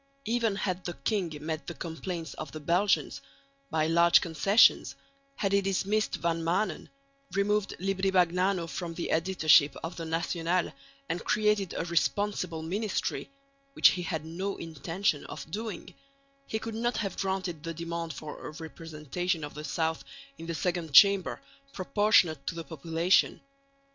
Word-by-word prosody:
Even 230 Hz, -2 st, +1 dB
had 185 Hz, -2 st, -2 dB
the 175 Hz, -, -5 dB
king 195 Hz, -7 st, -1 dB
met 160 Hz, +1 st, -4 dB
the 170 Hz, -, -5 dB
complaints 165 Hz, +2 st, -5 dB
of 155 Hz, -, -7 dB
the 155 Hz, -, -7 dB
Belgians 170 Hz, +1 st, +1 dB, 0.5 s
by 155 Hz, -1 st, +1 dB
large 170 Hz, +1 st, +5 dB
concessions, 175 Hz, +7 st, +4 dB, 0.4 s
had 195 Hz, -, -1 dB
he 200 Hz, 0 st, +4 dB
dismissed 195 Hz, +2 st, 0 dB
Van 165 Hz, -1 st, -1 dB
Maanen, 170 Hz, +2 st, -1 dB, 0.5 s
removed 205 Hz, +1 st, +1 dB
Libri 195 Hz, +1 st, 0 dB
Bagnano 180 Hz, 0 st, +2 dB
from 170 Hz, 0 st, -5 dB
the 170 Hz, -, -3 dB
editorship 160 Hz, -5 st, +4 dB
of 165 Hz, +2 st, -5 dB
the 165 Hz, -, -4 dB
National, 170 Hz, +2 st, -1 dB, 0.3 s
and 175 Hz, -, -3 dB
created 210 Hz, -3 st, +1 dB
a -, -, -2 dB
responsible 175 Hz, -1 st, 0 dB
ministry 200 Hz, +5 st, -2 dB, 0.4 s
which -, -, +7 dB
he 180 Hz, -, -2 dB
had 160 Hz, -3 st, -3 dB
no 185 Hz, +5 st, -4 dB
intention 165 Hz, +1 st, -2 dB
of 155 Hz, -, -8 dB
doing 215 Hz, -1 st, -5 dB, 0.5 s
he 220 Hz, -, -2 dB
could 225 Hz, +1 st, -6 dB
not 235 Hz, +1 st, -1 dB
have 195 Hz, -4 st, -3 dB
granted 190 Hz, -4 st, -2 dB
the 165 Hz, +1 st, -4 dB
demand 170 Hz, 0 st, -4 dB
for 150 Hz, +1 st, -8 dB
a -, -, -6 dB
representation 160 Hz, +1 st, -4 dB
of 145 Hz, -, -6 dB
the 150 Hz, -, -7 dB
south 160 Hz, +2 st, -1 dB, 0.4 s
in 165 Hz, -, -8 dB
the 170 Hz, -, -3 dB
Second 175 Hz, -3 st, -2 dB
Chamber 200 Hz, 0 st, +6 dB, 0.3 s
proportionate 180 Hz, -4 st, +2 dB
to -, -, -2 dB
the 165 Hz, -, -5 dB
population. 165 Hz, +4 st, +1 dB
175 Hz, 150 wpm, -29 LUFS, 160-195 Hz, 0.5 s, which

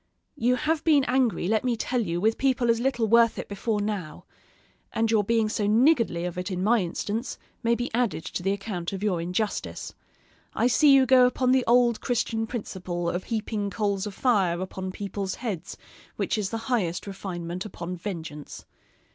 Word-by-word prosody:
You 250 Hz, -2 st, +2 dB
have 305 Hz, +3 st, 0 dB
been 300 Hz, -4 st, +4 dB
angry, 250 Hz, -8 st, +1 dB
let 220 Hz, +2 st, +1 dB
me 245 Hz, -2 st, 0 dB
tell 245 Hz, +2 st, -1 dB
you, 170 Hz, -5 st, -2 dB
with 220 Hz, +4 st, +1 dB
people 255 Hz, -3 st, +2 dB
as 230 Hz, -, 0 dB
little 245 Hz, -3 st, 0 dB
worth 230 Hz, +1 st, +4 dB
it -, -, -5 dB
before 210 Hz, +2 st, -2 dB
now; 205 Hz, -6 st, -4 dB, 0.7 s
and 225 Hz, 0 st, 0 dB
your 215 Hz, -2 st, +3 dB
being 225 Hz, +1 st, +2 dB
so 215 Hz, -1 st, -1 dB
niggardly 230 Hz, -, +3 dB
of 180 Hz, 0 st, -4 dB
it 180 Hz, +2 st, -4 dB
in 185 Hz, -1 st, -2 dB
my 230 Hz, +3 st, +4 dB
instance, 210 Hz, +6 st, -3 dB, 0.2 s
may 235 Hz, -1 st, +2 dB
be 245 Hz, 0 st, -4 dB
added 225 Hz, -9 st, 0 dB
to -, -, -4 dB
the 195 Hz, +2 st, 0 dB
account 195 Hz, -3 st, -4 dB
of 195 Hz, +1 st, -5 dB
your 185 Hz, -5 st, +1 dB
injustice. 180 Hz, +5 st, -3 dB, 0.6 s
I -, -, +1 dB
see 285 Hz, +4 st, +5 dB
you 270 Hz, -1 st, +6 dB
go 255 Hz, 0 st, +6 dB
upon 255 Hz, 0 st, +1 dB
the 260 Hz, -1 st, +4 dB
old 240 Hz, -1 st, +4 dB
Christian 225 Hz, -2 st, -1 dB
principle 180 Hz, -7 st, -3 dB
of 180 Hz, +1 st, -4 dB
heaping 215 Hz, -2 st, -2 dB
coals 200 Hz, -1 st, -1 dB
of 200 Hz, -, -7 dB
fire 195 Hz, -9 st, +2 dB
upon 185 Hz, 0 st, -5 dB
people's 195 Hz, 0 st, -4 dB
heads, 195 Hz, -8 st, -5 dB, 0.4 s
which -, -, -1 dB
is 210 Hz, -3 st, -1 dB
the 225 Hz, -, -3 dB
highest 195 Hz, -9 st, -1 dB
refinement 185 Hz, -3 st, -5 dB
upon 180 Hz, -4 st, -6 dB
vengeance. 165 Hz, -5 st, -7 dB
215 Hz, 185 wpm, -26 LUFS, 185-240 Hz, 0.7 s, you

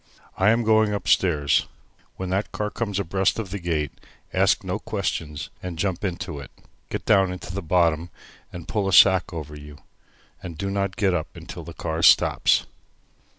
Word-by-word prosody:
"I 95 Hz, +2 st, +3 dB
am 115 Hz, +1 st, +3 dB
going 110 Hz, -1 st, +3 dB
upstairs. 80 Hz, -7 st, +2 dB, 0.5 s
When 95 Hz, -1 st, -5 dB
that 95 Hz, +2 st, -1 dB
car 105 Hz, 0 st, -3 dB
comes 105 Hz, -5 st, -3 dB
abreast 95 Hz, +1 st, 0 dB
of 105 Hz, -5 st, -5 dB
the 100 Hz, -, -4 dB
gate, 80 Hz, -5 st, -1 dB, 0.4 s
ask -, -, +3 dB
no -, -, -3 dB
questions 75 Hz, -3 st, -4 dB
and 90 Hz, -2 st, -6 dB
jump 95 Hz, 0 st, -2 dB
into 85 Hz, -6 st, -4 dB
it. 70 Hz, -, -10 dB, 0.4 s
Get -, -, -4 dB
down 95 Hz, -3 st, +4 dB
into 90 Hz, -1 st, -7 dB
the 100 Hz, -, -3 dB
bottom 85 Hz, -1 st, +1 dB, 0.4 s
and 85 Hz, -2 st, -9 dB
pull 105 Hz, -3 st, -1 dB
a 95 Hz, -, 0 dB
sack 95 Hz, 0 st, +6 dB
over 75 Hz, -3 st, -7 dB
you, 75 Hz, 0 st, -11 dB, 0.6 s
and 85 Hz, -3 st, -8 dB
do 100 Hz, +4 st, -3 dB
not 100 Hz, -1 st, -1 dB
get 95 Hz, -3 st, +1 dB
up 85 Hz, -4 st, -3 dB
until -, -, -9 dB
the -, -, -10 dB
car 80 Hz, 0 st, -3 dB
stops." -, -, +4 dB
90 Hz, 175 wpm, -24 LUFS, 80-100 Hz, 0.6 s, sack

